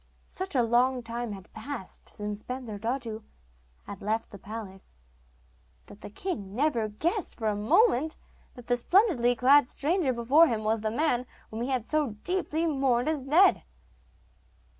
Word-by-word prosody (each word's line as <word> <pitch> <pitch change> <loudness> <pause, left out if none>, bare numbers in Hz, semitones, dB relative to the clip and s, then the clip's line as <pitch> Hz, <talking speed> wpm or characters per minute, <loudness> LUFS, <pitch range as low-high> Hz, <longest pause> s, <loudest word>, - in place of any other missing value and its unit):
Such 375 -3 -3
a 245 - +4
long 245 +2 +2
time 230 -1 -4
had 190 -2 -12
passed 220 -2 -7
since 210 0 -6
Bensurdatu 230 -1 -4 0.6
had 200 - -9
left 220 +2 -2
the 200 - -10
palace, 195 - -9 0.9
that 205 - -15
the - - -8
king 205 - -5
never 250 -5 +1
guessed 340 - -1
for 220 - -2
a 210 - +1
moment 315 - +2 0.4
that 245 - -12
the 245 0 +1
splendidly 255 - +3
clad 270 +2 +5
stranger 315 -1 0
before 255 +7 +4
him 225 -3 -2
was 220 0 0
the 215 - -1
man 250 0 0 0.2
whom 220 +1 -5
he 245 - -2
had 255 -4 -1
so 295 -7 -1
deeply 355 -3 -1
mourned 270 -4 +1
as 290 -4 -2
dead. 345 +7 +5
245 Hz, 155 wpm, -28 LUFS, 220-295 Hz, 0.9 s, clad